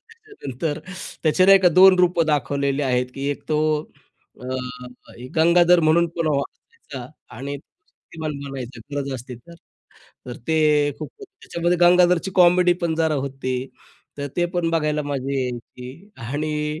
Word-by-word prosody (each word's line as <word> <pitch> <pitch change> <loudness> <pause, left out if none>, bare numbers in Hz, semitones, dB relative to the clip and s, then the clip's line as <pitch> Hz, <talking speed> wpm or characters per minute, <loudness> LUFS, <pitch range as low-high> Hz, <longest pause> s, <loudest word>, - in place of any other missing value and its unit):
त्याच्यानंतर 415 - -6 0.4
त्याचे 160 +3 +3
नाही 195 0 +8
का 180 - +5
2 185 +2 +7
रूपं 175 -2 +3
दाखवलेले 140 -1 0
आहेत, 125 -2 +1
की 135 +1 -4
एक 145 - -5
तो 155 -1 +1 0.8
अ, 125 - -9 0.9
गंगाधर 170 +2 +5
म्हणून 165 +2 +3
पण 165 -1 -1
व्हायचा 140 -2 -5 0.3
आणि 140 +3 -5
शक्तिमान 155 +1 -10
बनायचा 130 -3 -7
गरज 140 -1 -3
असती 125 0 -8
तर. 170 +8 -16 0.7
तर 125 - -7
ते 160 - +2 0.4
खूप 155 - -6
त्याच्यामध्ये 180 - -3
गंगाधरची 180 +1 +4
कॉमेडी 180 0 +5
पण 165 -2 0
जरा 160 -1 +1
होती. 135 -1 -3 0.7
तर 140 - -3
ते 175 - +2
पण 170 -2 0
बघायला 150 -2 0
मजा 140 -1 -3
यायची 125 0 -6 0.4
आणि 150 +2 -3
155 Hz, 135 wpm, -22 LUFS, 140-175 Hz, 0.9 s, नाही